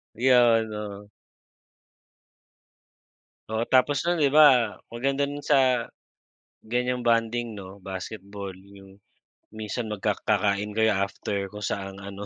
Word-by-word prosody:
'Yun, 120 Hz, -3 st, +4 dB
oo. 105 Hz, -1 st, -7 dB, 2.4 s
Oo, 110 Hz, +1 st, -1 dB
tapos 130 Hz, +2 st, +3 dB
no'n 175 Hz, -4 st, +2 dB
'di 140 Hz, -, +3 dB
ba, 130 Hz, -8 st, +5 dB
maganda 135 Hz, +4 st, -1 dB, 0.2 s
sa 130 Hz, -4 st, +2 dB, 0.8 s
ganyang 125 Hz, +1 st, -1 dB
bonding 115 Hz, -1 st, 0 dB
'no, 95 Hz, 0 st, -10 dB
basketball 100 Hz, +1 st, -7 dB
'yung 95 Hz, +1 st, -16 dB, 0.5 s
minsan 110 Hz, +2 st, -4 dB
magka 105 Hz, -1 st, -2 dB
kakain 105 Hz, 0 st, +1 dB
kayo 110 Hz, -2 st, +2 dB
after 100 Hz, 0 st, -2 dB
kung 105 Hz, -, -8 dB
saan 95 Hz, -1 st, -4 dB
ano, 100 Hz, +1 st, -8 dB
110 Hz, 110 wpm, -26 LUFS, 100-125 Hz, 2.4 s, ba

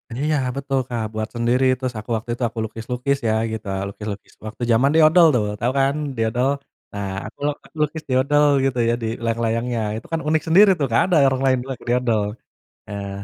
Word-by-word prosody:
Iya, 150 Hz, +4 st, 0 dB, 0.2 s
betul, 135 Hz, -1 st, -1 dB
Kak, 120 Hz, -2 st, -2 dB
buat 110 Hz, 0 st, -3 dB
sendiri. 120 Hz, +2 st, +1 dB, 0.2 s
Terus 130 Hz, -1 st, -3 dB
aku 105 Hz, -, -12 dB
waktu 110 Hz, +2 st, -5 dB
itu 120 Hz, -, -4 dB
aku 115 Hz, 0 st, -7 dB
lukis-lukis 125 Hz, +5 st, -2 dB
ya, 110 Hz, -, +2 dB, 0.2 s
gitu. 110 Hz, -1 st, -6 dB, 0.2 s
Lukis-lukis 100 Hz, 0 st, -7 dB
waktu 110 Hz, +3 st, -6 dB
zaman 125 Hz, +5 st, +4 dB
doodle, 160 Hz, +2 st, +6 dB
tuh. 115 Hz, -, +2 dB, 0.2 s
Tahu 120 Hz, +1 st, +1 dB
kan 135 Hz, +1 st, +3 dB, 0.2 s
doodle? 115 Hz, +4 st, +1 dB, 0.4 s
Nah, 100 Hz, -1 st, -4 dB, 0.2 s
aku 110 Hz, -, -14 dB, 0.4 s
lukis 150 Hz, +1 st, -1 dB
doodle 140 Hz, +3 st, +3 dB, 0.2 s
gitu 135 Hz, -2 st, 0 dB
ya 115 Hz, -, +2 dB
di -, -, -1 dB, 0.2 s
layang-layangnya. 115 Hz, +1 st, -1 dB, 0.2 s
Itu 115 Hz, -, -10 dB
kan 165 Hz, -, 0 dB
unik 155 Hz, 0 st, +2 dB
sendiri 195 Hz, +5 st, +7 dB
tuh, 140 Hz, -, +2 dB
nggak 115 Hz, -, +3 dB
ada -, -, +4 dB
orang 130 Hz, 0 st, 0 dB
lain 130 Hz, -1 st, +3 dB
lagi 130 Hz, -, -6 dB
doodle. 120 Hz, -3 st, +1 dB, 0.6 s
Nah 100 Hz, -1 st, -5 dB
125 Hz, 185 wpm, -21 LUFS, 115-140 Hz, 0.6 s, sendiri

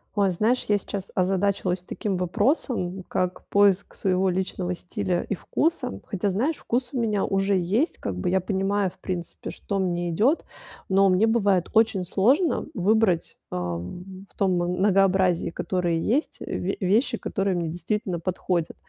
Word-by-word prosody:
Ой, 200 Hz, -2 st, +3 dB
знаешь, 220 Hz, +8 st, +1 dB
я 205 Hz, -1 st, +3 dB
сейчас 200 Hz, -1 st, -6 dB
озадачилась 185 Hz, -1 st, 0 dB
таким 195 Hz, 0 st, -3 dB
вопросом, 190 Hz, -, 0 dB
как 180 Hz, 0 st, -2 dB
поиск 200 Hz, -1 st, +3 dB
своего 190 Hz, 0 st, +1 dB
личного 180 Hz, 0 st, -2 dB
стиля 180 Hz, 0 st, -2 dB
и 205 Hz, -, 0 dB
вкуса. 300 Hz, -, -1 dB
Хотя, 200 Hz, +1 st, -2 dB
знаешь, 250 Hz, -, 0 dB
вкус 245 Hz, +1 st, -2 dB
у 255 Hz, -, -1 dB
меня 215 Hz, -4 st, +1 dB
уже 195 Hz, +1 st, +1 dB
есть, 195 Hz, -, 0 dB
как 95 Hz, -, -3 dB
бы, 90 Hz, -, -1 dB
я 190 Hz, +1 st, +3 dB
понимаю, 195 Hz, +1 st, 0 dB
в -, -, -21 dB
принципе, 175 Hz, -3 st, -5 dB
что 200 Hz, -, -4 dB
мне 175 Hz, -2 st, -1 dB
идет, 230 Hz, -, +2 dB, 0.4 s
но 195 Hz, +1 st, +5 dB
мне 185 Hz, +4 st, +4 dB
бывает 200 Hz, -6 st, +2 dB
очень 220 Hz, -4 st, +3 dB
сложно 245 Hz, -, +2 dB
выбрать, 195 Hz, -2 st, +1 dB
ам, 90 Hz, -, -5 dB
в -, -, -27 dB
том 195 Hz, -2 st, +2 dB
многообразии, 185 Hz, 0 st, +2 dB
которые 175 Hz, -2 st, -1 dB
есть, 265 Hz, -, 0 dB
ве 190 Hz, +2 st, -3 dB
вещи, 225 Hz, +6 st, +2 dB
которые 195 Hz, -3 st, -1 dB
мне 170 Hz, -2 st, -1 dB
действительно 180 Hz, +1 st, -2 dB
подходят. 175 Hz, -1 st, -2 dB
190 Hz, 150 wpm, -25 LUFS, 180-210 Hz, 0.4 s, но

